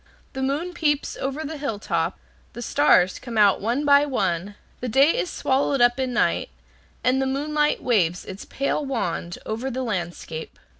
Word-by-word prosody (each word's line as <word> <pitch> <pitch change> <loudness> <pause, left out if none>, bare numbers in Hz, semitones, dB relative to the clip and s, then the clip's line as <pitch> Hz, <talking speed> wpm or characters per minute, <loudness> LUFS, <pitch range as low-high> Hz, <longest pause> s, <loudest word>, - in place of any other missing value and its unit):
The 265 - -4
moon 290 +7 -1
peeps 295 -4 0
over 275 +4 -3
the 310 0 -6
hilltop, 225 -8 -2 0.4
the 240 - -6
stars 190 -10 +3
come 235 -3 -6
out 205 -2 +5
one 240 +8 0
by 285 0 +6
one, 200 - -1 0.2
the 250 - -4
day 275 +7 +5
is 360 - -1
swallowed 275 -1 0
up 245 +1 +4
in 260 -1 -1
night, - - +1 0.5
and 255 +1 +2
the 265 - 0
moonlight 295 +2 0
waves 180 -8 +1
its 190 +1 -8
pale 275 +2 -1
wand 180 -10 -3
over 230 +5 -3
the 260 0 -3
landscape. 175 -6 -5
260 Hz, 165 wpm, -24 LUFS, 210-285 Hz, 0.5 s, by